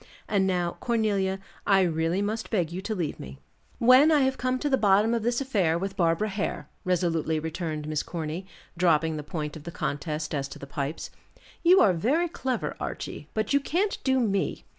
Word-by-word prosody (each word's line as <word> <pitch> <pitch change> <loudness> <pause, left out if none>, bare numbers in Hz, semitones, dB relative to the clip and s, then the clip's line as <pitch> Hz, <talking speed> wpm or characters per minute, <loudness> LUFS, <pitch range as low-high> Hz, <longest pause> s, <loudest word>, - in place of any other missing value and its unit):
"And 195 -2 +2
now, 175 -2 -1
Cornelia, 205 -5 0 0.3
I 195 -1 +5
really 165 +2 +1
must 220 +2 -3
beg 175 -7 0
you 180 +2 -4
to 215 +2 -3
leave 170 -6 -3
me." 65 +1 -9 0.4
"When 255 +6 +7
I 300 -2 +5
have 265 0 +2
come 255 0 0
to 290 - -2
the 275 - +3
bottom 210 0 +3
of 235 - 0
this 240 +3 0
affair 195 -12 +1
with 195 +2 -4
Barbara 170 +3 +1
Hare," 200 0 -3 0.2
resolutely 165 -4 0
returned 155 -1 -4
Miss 155 -1 -1
Corny, 165 +2 -5 0.3
dropping 160 -2 +2
the - - -3
point 150 0 -5
of 155 - -9
the 170 - -6
contest 150 0 -3
as 140 -2 -1
to - - -10
the - - -8
pipes. 140 +2 -4 0.5
"You 360 +2 +6
are 200 -4 +5
very 275 - +1
clever, 260 -6 -3
Archie, - - -6
but 215 +4 0
you 280 - +5
can't 360 +9 -1
do 265 -1 +2
me. 200 -5 0
190 Hz, 195 wpm, -27 LUFS, 160-230 Hz, 0.5 s, When